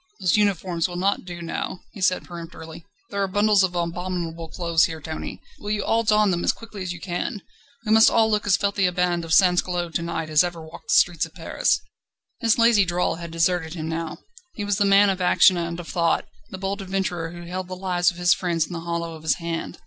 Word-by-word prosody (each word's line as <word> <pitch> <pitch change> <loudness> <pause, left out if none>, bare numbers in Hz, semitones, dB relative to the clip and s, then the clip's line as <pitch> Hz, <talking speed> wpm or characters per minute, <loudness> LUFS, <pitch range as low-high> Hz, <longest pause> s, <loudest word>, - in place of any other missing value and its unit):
"Those 180 - +2
uniforms 190 -5 +1
will 175 - -8
not 190 +2 0
do 175 -1 -7
now," 175 +2 -4
he 200 - -11
said 185 0 +1
peremptorily; 165 -1 -9 0.3
"there 200 - -2
are 195 - +1
bundles 205 +1 +3
of 185 -2 0
abominable 170 -1 -3
clothes 170 -2 +2
here, 160 -1 -5
Tony. 160 0 -6 0.2
Will 205 - -6
you 210 -1 -1
all 225 +1 +2
don 210 -2 +3
them 175 -1 -1
as - - +3
quickly 225 -3 -10
as 180 -1 -3
you 180 - -7
can? 190 +5 -4 0.4
We 215 - -1
must 220 +1 +7
all 225 -1 +3
look 210 -1 0
as 195 - +4
filthy 200 -2 +1
a - - 0
band 175 -1 0
of 165 - -7
sansculottes 180 -1 +3
to - - -6
night 165 -2 -4
as 155 +1 +5
ever 175 -1 -4
walked 160 0 -12
the - - +3
streets 170 -2 +3
of 165 - -23
Paris." 165 -3 0 0.6
His 225 -2 +2
lazy 230 -3 +5
drawl 180 -2 0
had 170 0 -7
deserted 165 0 0
him 160 -2 -4
now. 165 -1 -4 0.4
He 205 - -4
was 205 -1 0
the 205 - +3
man 200 0 +5
of 190 -1 -4
action 180 +1 +5
and 170 0 -3
of 170 - -8
thought, 170 -2 +1 0.2
the 190 - -7
bold 195 +2 -3
adventurer 185 -3 -2
who 175 +1 -9
held 180 +1 -5
the 185 - -6
lives 180 -1 +1
of 175 - -8
his 175 0 +4
friends 170 -3 -1
in 180 - -9
the 170 - -4
hollow 170 0 -3
of 160 - -10
his 160 0 +1
hand. 170 -1 -5
180 Hz, 235 wpm, -23 LUFS, 170-195 Hz, 0.6 s, must